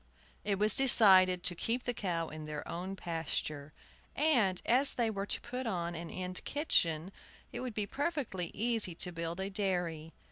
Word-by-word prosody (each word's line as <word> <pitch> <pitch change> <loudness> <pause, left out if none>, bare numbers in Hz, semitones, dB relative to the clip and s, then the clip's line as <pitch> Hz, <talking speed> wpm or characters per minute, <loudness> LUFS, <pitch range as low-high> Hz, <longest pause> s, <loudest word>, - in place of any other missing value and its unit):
It 200 -1 -1
was 210 +1 +6
decided 190 -8 +6
to 180 - +2
keep 230 +8 -2
the 245 - -2
cow 170 -7 -2
in 155 0 -8
their 150 -1 -6
own 185 +3 -5
pasture; 155 -4 -3 0.4
and 240 - +2
as 260 +4 +2
they 230 -2 +1
were 200 -1 -4
to - - 0
put 250 +1 -5
on 175 -5 -2
an 170 0 -6
end 185 0 -4
kitchen, 175 - +1 0.4
it - - -6
would 250 -4 -5
be 210 - -1
perfectly 270 - -3
easy 220 -5 0
to 180 +1 +1
build 170 +1 -5
a 195 +1 -3
dairy. 175 -6 -2
190 Hz, 175 wpm, -32 LUFS, 170-230 Hz, 0.4 s, was